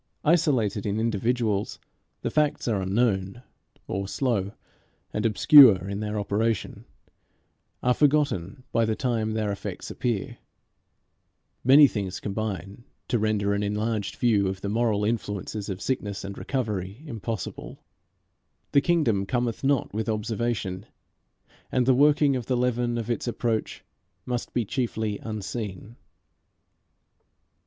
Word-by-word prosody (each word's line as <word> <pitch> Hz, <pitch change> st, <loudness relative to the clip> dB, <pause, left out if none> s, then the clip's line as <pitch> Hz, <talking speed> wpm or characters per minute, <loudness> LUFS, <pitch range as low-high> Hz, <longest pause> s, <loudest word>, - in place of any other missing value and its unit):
Isolated 125 Hz, -, +2 dB
in 105 Hz, +2 st, -1 dB
individuals, 115 Hz, -1 st, 0 dB, 0.5 s
the -, -, -1 dB
facts 150 Hz, -3 st, +1 dB
are 105 Hz, -5 st, +1 dB
unknown; 100 Hz, +2 st, 0 dB, 0.4 s
or, 95 Hz, 0 st, -3 dB
slow 105 Hz, -4 st, -1 dB, 0.6 s
and 105 Hz, +2 st, +1 dB
obscure 110 Hz, -, +7 dB
in 100 Hz, 0 st, -3 dB
their 105 Hz, 0 st, -2 dB
operation, 105 Hz, +2 st, -1 dB, 1.0 s
are 125 Hz, -, +4 dB
forgotten 135 Hz, -, +1 dB
by 115 Hz, -, +2 dB
the 110 Hz, -1 st, 0 dB
time 115 Hz, -4 st, -1 dB
their 110 Hz, -2 st, -1 dB
effects 100 Hz, -, -6 dB
appear. 115 Hz, -5 st, -3 dB, 1.2 s
Many 140 Hz, +4 st, +8 dB
things 100 Hz, -7 st, -2 dB
combine 100 Hz, 0 st, -4 dB, 0.3 s
to 120 Hz, -, +1 dB
render 105 Hz, -2 st, +1 dB
an 100 Hz, -, 0 dB
enlarged 105 Hz, 0 st, -2 dB
view 105 Hz, -5 st, +2 dB
of 95 Hz, 0 st, -4 dB
the 100 Hz, -, -3 dB
moral 110 Hz, -2 st, +1 dB
influences 105 Hz, -2 st, -3 dB
of 95 Hz, -1 st, -4 dB
sickness 105 Hz, -7 st, -2 dB
and 100 Hz, 0 st, -6 dB
recovery 105 Hz, -, -3 dB
impossible. 115 Hz, -, -6 dB, 0.9 s
The 140 Hz, -, +5 dB
kingdom 130 Hz, -, +1 dB
cometh 120 Hz, 0 st, -1 dB
not 135 Hz, -6 st, +1 dB
with 110 Hz, +1 st, -2 dB
observation, 110 Hz, -3 st, -2 dB, 0.8 s
and 125 Hz, -1 st, +2 dB
the 130 Hz, -, +5 dB
working 145 Hz, +1 st, +4 dB
of 125 Hz, -3 st, -4 dB
the 125 Hz, -, +1 dB
leaven 120 Hz, -1 st, 0 dB
of 115 Hz, 0 st, -3 dB
its 120 Hz, -, -2 dB
approach 115 Hz, -2 st, -2 dB, 0.4 s
must 120 Hz, -1 st, -3 dB
be 120 Hz, -, 0 dB
chiefly 110 Hz, -3 st, -2 dB
unseen. 110 Hz, 0 st, -6 dB
110 Hz, 125 wpm, -26 LUFS, 100-125 Hz, 1.2 s, Many